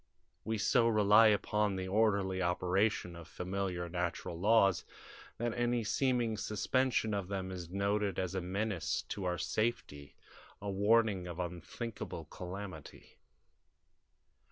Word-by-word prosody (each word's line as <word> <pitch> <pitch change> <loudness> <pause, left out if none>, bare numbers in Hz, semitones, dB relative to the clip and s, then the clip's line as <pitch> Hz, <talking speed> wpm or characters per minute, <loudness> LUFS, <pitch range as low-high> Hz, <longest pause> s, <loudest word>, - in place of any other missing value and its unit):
We 110 +1 -1
so 115 +3 +3
rely 105 0 +6
upon 105 -1 +1
the 95 0 -3
orderly 100 -2 +2
operation 90 +1 +1
of 85 -1 -10
familiar 90 -1 -3
natural 85 -1 -3
laws 100 -2 +4 0.5
that 120 0 -1
any 120 -1 0
seeming 120 -1 +1
suspension 110 +2 0
of 100 -3 -2
them 95 -1 -3
is 90 -2 -6
noted 100 +1 0
as 95 -1 -2
a 95 - -1
menace 95 0 -2
to 100 -2 -4
our 90 -1 0
safety, 75 - -2 0.4
a 100 0 -4
warning 100 -2 +2
of 85 -1 -6
unthinkable 90 +1 -5
calamity. 90 -4 -8
100 Hz, 125 wpm, -33 LUFS, 90-110 Hz, 0.5 s, rely